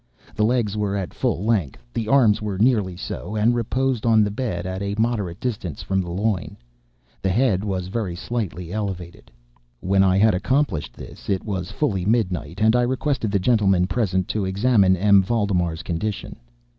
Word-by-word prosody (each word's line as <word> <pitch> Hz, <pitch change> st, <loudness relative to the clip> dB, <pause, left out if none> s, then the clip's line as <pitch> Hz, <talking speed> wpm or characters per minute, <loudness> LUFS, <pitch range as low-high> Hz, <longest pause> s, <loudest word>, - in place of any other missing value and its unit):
The 105 Hz, -, 0 dB
legs 110 Hz, -2 st, +1 dB
were 105 Hz, -1 st, -1 dB
at 95 Hz, -3 st, -4 dB
full 85 Hz, -, -1 dB
length; 100 Hz, -, 0 dB
the 110 Hz, -, -2 dB
arms 115 Hz, -5 st, +4 dB
were 105 Hz, -3 st, -3 dB
nearly 105 Hz, -5 st, +2 dB
so, 105 Hz, +2 st, -6 dB
and 110 Hz, +3 st, +3 dB
reposed 125 Hz, +1 st, -1 dB
on 110 Hz, -2 st, +4 dB
the 105 Hz, -, -1 dB
bed 100 Hz, -6 st, -3 dB
at 95 Hz, +1 st, -4 dB
a 100 Hz, 0 st, -2 dB
moderate 110 Hz, -6 st, -1 dB
distance 100 Hz, -, -4 dB
from 95 Hz, 0 st, 0 dB
the 90 Hz, -, -6 dB
loin. 95 Hz, 0 st, -2 dB, 0.6 s
The 95 Hz, -, 0 dB
head 105 Hz, -2 st, +2 dB
was 95 Hz, -3 st, -2 dB
very 95 Hz, -3 st, -3 dB
slightly 90 Hz, -4 st, -4 dB
elevated. 95 Hz, -5 st, -5 dB, 0.5 s
When 95 Hz, +1 st, +2 dB
I 95 Hz, 0 st, +3 dB
had 110 Hz, +1 st, +4 dB
accomplished 130 Hz, -, 0 dB
this, -, -, -11 dB
it 95 Hz, -2 st, 0 dB
was 95 Hz, -4 st, -3 dB
fully 105 Hz, -5 st, -1 dB
midnight, 95 Hz, -5 st, -1 dB
and 110 Hz, +2 st, +4 dB
I 125 Hz, -, +4 dB
requested 130 Hz, -1 st, 0 dB
the 100 Hz, -, +1 dB
gentlemen 95 Hz, -3 st, +3 dB
present 95 Hz, -3 st, 0 dB
to 105 Hz, -, -1 dB
examine 95 Hz, -1 st, +3 dB
M. 100 Hz, +1 st, +5 dB
Valdemar's 90 Hz, -5 st, 0 dB
condition. 95 Hz, +5 st, -4 dB
100 Hz, 175 wpm, -22 LUFS, 95-115 Hz, 0.6 s, M